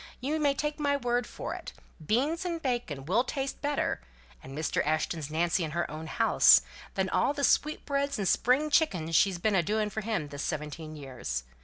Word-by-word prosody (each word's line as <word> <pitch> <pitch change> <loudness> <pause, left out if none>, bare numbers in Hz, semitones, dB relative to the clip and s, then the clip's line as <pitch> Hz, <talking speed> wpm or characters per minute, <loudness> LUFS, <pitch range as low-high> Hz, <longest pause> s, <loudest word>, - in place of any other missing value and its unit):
You 295 +5 -1
may 285 -2 +2
take 295 +2 -2
my 285 -1 +2
word 245 -2 0
for - - -5
it, - - -8 0.3
beans 280 - +1
and 345 -2 -2
bacon 240 - -3
will 210 - +2
taste 270 +1 -4
better 290 0 -1 0.4
(and 135 +2 -9
Mr. 155 -1 0
Ashton's 155 0 -1
Nancy 170 +4 +1
in 160 - -2
her 175 - -1
own 155 +1 -6
house) - - +6 0.3
than 190 -1 +1
all 275 - +1
the 285 -1 -4
sweetbreads 280 -1 +1
and 200 -2 -1
spring 275 +10 +2
chickens 180 - +2
she's 190 +2 +4
been 210 +4 +1
a 190 - +4
doing 210 +4 -1
for 220 - -3
him 210 -9 -2
this 145 0 -6
seventeen 155 +1 -4
years. 130 - -5
215 Hz, 190 wpm, -29 LUFS, -, 0.4 s, house